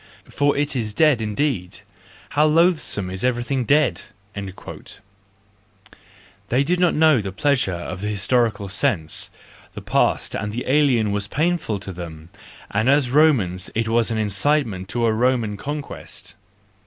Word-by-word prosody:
for 145 0 +1
it 145 0 0
is 110 -4 -3
dead 150 -7 +4
indeed: 105 -5 -2 0.5
how 150 - +2
loathsome 155 - +2
is 95 0 -4
everything 125 +1 0
dead! 145 +2 +2 0.2
' 100 0 -37
—They 100 -1 -6 2.1
did 175 +5 0
not 180 -1 +3
know 155 -6 +4
the 100 -1 -5
pleasure 140 -1 +1
of 90 +2 -6
the 105 - -3
historical 105 0 0
sense; 95 - -1 0.4
the - - -8
past - - +1
and 105 +1 -3
the 120 +3 -4
alien 130 -6 +3
was 100 -1 -2
painful 155 - 0
to 95 - -7
them, 80 -2 -9 0.4
and 110 +5 +1
as 140 -3 +3
Romans 115 - +3
it 115 +1 0
was 115 +1 +2
an 115 - -1
incitement 105 -2 0
to 120 +4 0
a 110 - +2
Roman 120 -2 +1
conquest. 145 +6 -7
115 Hz, 145 wpm, -22 LUFS, 100-145 Hz, 2.1 s, dead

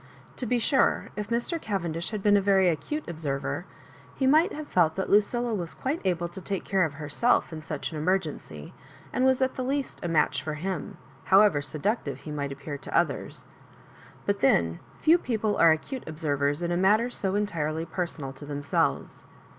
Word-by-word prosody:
To 250 - -3
be 245 - +2
sure^ 265 +4 +2
if 210 0 -4
Mr. 240 +8 -1
Cav 200 -3 -2
endish 165 0 -3
had 215 -3 -4
been 205 -1 +5
a 200 - +4
very 190 -2 +4
acute 175 - -3
observer, 150 -5 -3 0.5
he 265 - 0
might 315 +8 +5
have 305 0 -6
felt 160 -3 +2
that 190 - -2
Lucilla 235 +3 +3
was 175 -5 -3
quite 285 +5 -2
able 175 -2 0
to 190 +2 -9
take 195 0 -3
care 190 -2 +2
of 150 -2 -5
herself 155 +7 +1
in 155 - -6
such 155 0 -4
an 155 - -4
emergency, 155 - -2 0.4
and 255 - +2
was 260 0 +3
at 260 - 0
the 255 - -3
least 275 +1 -2
a 175 - -2
match 155 -3 +2
for 155 +1 -4
him, 180 +1 -4 0.3
however 195 -6 +5
seductive 145 - -2
he 155 - -7
might 140 -2 -3
appear 140 +1 -6
to - - -2
others; - - -1 0.8
but 200 0 0
then, 85 -10 +3 0.2
few 330 +3 +5
people 220 -7 -1
are 165 - +7
acute 235 - -2
observers 145 -1 -1
in 170 - -1
a 175 - +1
matter 215 +6 +3
so 195 -4 -1
entirely 165 -6 -1
personal 160 -5 -4
to 140 - -12
themselves. 145 -1 -1
180 Hz, 190 wpm, -27 LUFS, 155-220 Hz, 0.8 s, are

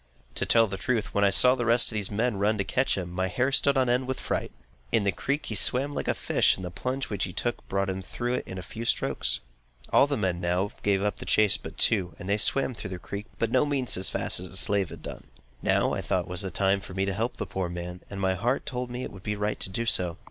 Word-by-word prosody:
To - - -2
tell 115 -1 +5
the 95 -3 -5
truth, 125 -6 -1
when 100 - +2
I 100 - +5
saw 125 +6 +7
all - - +3
the 125 - -2
rest 120 +1 +4
of - - -7
the 100 - -3
men 115 0 0
run 105 +2 +1
to 100 - 0
catch 130 +4 0
him, 90 -2 -4
my 95 +1 -1
hair 130 +7 0
stood 140 0 +4
on 130 -1 +3
end 125 +1 +1
with 130 - -3
fright. - - -3 0.4
In 110 - +2
the 100 - +2
creek, 140 +8 -2
he - - -4
swam 130 +7 +5
like - - -4
a - - +1
fish, - - +2
and 95 - -7
the 90 - -5
plunge 130 +8 -3
which 100 -2 0
he 90 - -7
took 120 +6 -3
brought 100 0 0
him 95 0 -3
through 120 +5 -3
it - - -3
in 95 - -6
a 90 - -6
few 115 +6 -7
strokes. 115 - 0 0.5
All 140 - +6
the 145 - -1
men 95 -4 -1
now 90 +3 0
gave 100 -1 +1
up 105 - -1
the - - -8
chase 105 -1 +4
but - - -10
two, 95 -6 +1
and 90 - -9
they 100 +1 +2
swam 135 +4 +2
through 110 - -7
the 95 - -5
creek, 100 +4 -7
but 115 -1 -1
by - - -6
no 130 - +4
means 140 -4 -1
so 90 - 0
fast 95 - +1
as 90 0 -4
the 95 - +1
slave 100 -3 +3
had - - -11
done. - - -8 0.4
Now, - - +2
I - - -2
thought, - - -1
was 90 +1 -3
the 95 - -3
time 95 +2 +1
for 95 -1 -10
me 95 0 0
to 100 - -1
help 115 +5 -2
the - - -3
poor 95 -2 -3
man, 90 +1 -6
and 100 - -6
my 95 -1 +1
heart 120 +8 -1
told 125 -1 -4
me 125 +1 -5
it - - -6
would 95 - -12
be 105 +2 -3
right 105 +1 -2
to - - -2
do 115 +5 -2
so. 90 -6 +1
105 Hz, 290 wpm, -27 LUFS, 95-125 Hz, 0.5 s, saw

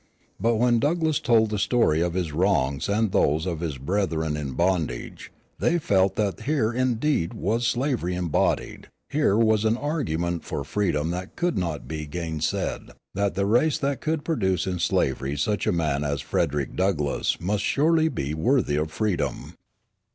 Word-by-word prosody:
But, 115 +4 +2
when 120 +1 +3
Douglass 160 +2 +1
told 110 -3 +3
the 105 - -1
story 105 -7 +2
of 85 0 -1
his 90 -4 -1
wrongs 75 -4 +1
and 105 0 +1
those 80 0 +2
of 85 -4 -2
his 80 -5 -3
brethren 80 0 -1
in 70 -3 -4
bondage, 85 -5 -2 0.3
they 170 - +2
felt 95 - +2
that 100 -3 -1
here 120 -3 0
indeed 125 - 0
was 115 +4 0
slavery 120 -8 0
embodied, 90 -4 -1 0.2
here 145 -9 +2
was 110 -2 +3
an 110 +1 +2
argument 85 - -2
for 70 - -4
freedom 85 -2 -1
that 90 +2 -5
could 175 -4 0
not 85 -6 -3
be 75 -1 -5
gainsaid, 80 0 -3 0.2
that 100 -1 0
the 100 +1 +1
race 125 +9 +3
that 140 -1 -2
could 155 -1 -2
produce 95 - 0
in 90 -2 -2
slavery 70 -3 0
such 100 +8 0
a - - +4
man 75 -4 0
as 70 -1 -1
Frederick 70 -1 -1
Douglass 85 -7 0
must 100 +3 -1
surely 160 +2 +3
be 70 - -3
worthy 80 - +1
of 75 +1 -1
freedom. 105 -1 -2
95 Hz, 165 wpm, -25 LUFS, 80-120 Hz, 0.3 s, a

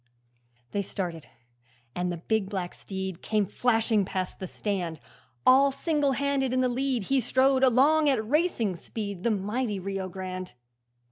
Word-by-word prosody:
They 205 - 0
started, 175 -5 -5 0.7
and 180 0 -1
the 175 - -3
big 200 +3 -1
black 185 -4 -3
steed 190 -2 -5
Came 215 -2 +1
flashing 225 -1 +2
past 185 -1 -4
the 185 - -4
stand; 180 -6 -3 0.5
All 275 +2 +6
single 285 0 +1
handed 275 -1 0
in 255 - +2
the 255 - +3
lead 255 -2 0
He 270 +6 +2
strode 260 +2 +3
along 285 +5 +5
at 220 -6 +1
racing 245 - +1
speed, 200 0 -6
The 235 - +1
mighty 210 +1 -1
Rio 195 0 -4
Grande. 185 -3 -6
215 Hz, 150 wpm, -27 LUFS, 190-260 Hz, 0.7 s, All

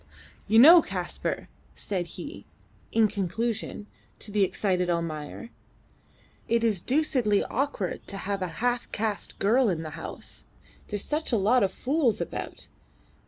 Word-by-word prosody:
"You 220 - +4
know, 330 +8 +10
Kaspar," - - -4 0.3
said 185 -4 -3
he, 300 +1 -8 0.4
in 225 -1 +4
conclusion, 210 +2 -3 0.3
to 210 - -8
the 205 -1 +3
excited 180 -2 0
Almayer, 165 +4 -3 1.0
"it 230 0 +2
is 210 -6 +1
deucedly 255 -7 +2
awkward 250 -8 -2
to 200 - -6
have 195 0 -3
a 185 - 0 0.2
half 245 -1 0
caste 215 -1 -2
girl 230 +4 +3
in 165 -3 -1
the 155 - -6
house. - - -7 0.4
There's 205 -1 -3
such 300 0 -1
a 235 - +3
lot 215 +6 +3
of 195 -1 +2
fools 265 0 +1
about. - - -6
210 Hz, 140 wpm, -27 LUFS, 195-245 Hz, 1.0 s, know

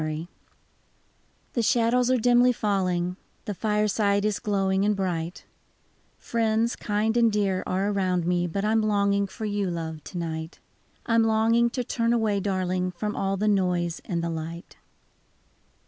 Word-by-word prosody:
I 155 +2 -3 1.3
HE 235 - +1
shadows 240 +1 +2
are 255 - +3
dimly 245 +1 +4
falling, 185 -5 -1 0.3
The 205 - -3
fireside 210 0 +1
is 210 -3 0
glowing 195 -3 0
and 210 0 +2
bright, 175 -3 -3 0.7
Friends 225 0 0
kind 215 +2 -1
and 230 -1 +4
dear 200 -3 0
are 190 +2 0
around 185 -3 0
me. 175 0 +1
But 195 +4 -2
I 215 - +1
'm 225 0 +3
longing 200 -1 +1
for 215 +3 -7
you, 205 -2 -1
love, 160 -2 -5
to 180 - -7
night; 160 -1 -4 0.5
I 230 - -1
'm 230 - +5
longing 225 +2 +3
to 250 +1 -3
turn 230 0 0
away, 220 -4 +1
darling, 185 -2 -1
From 210 +4 -3
all 195 0 -1
the 210 +2 0
noise 180 -4 +1
and 170 -2 -3
the 170 - -2
light. 165 +2 -6
200 Hz, 160 wpm, -26 LUFS, 180-220 Hz, 1.3 s, m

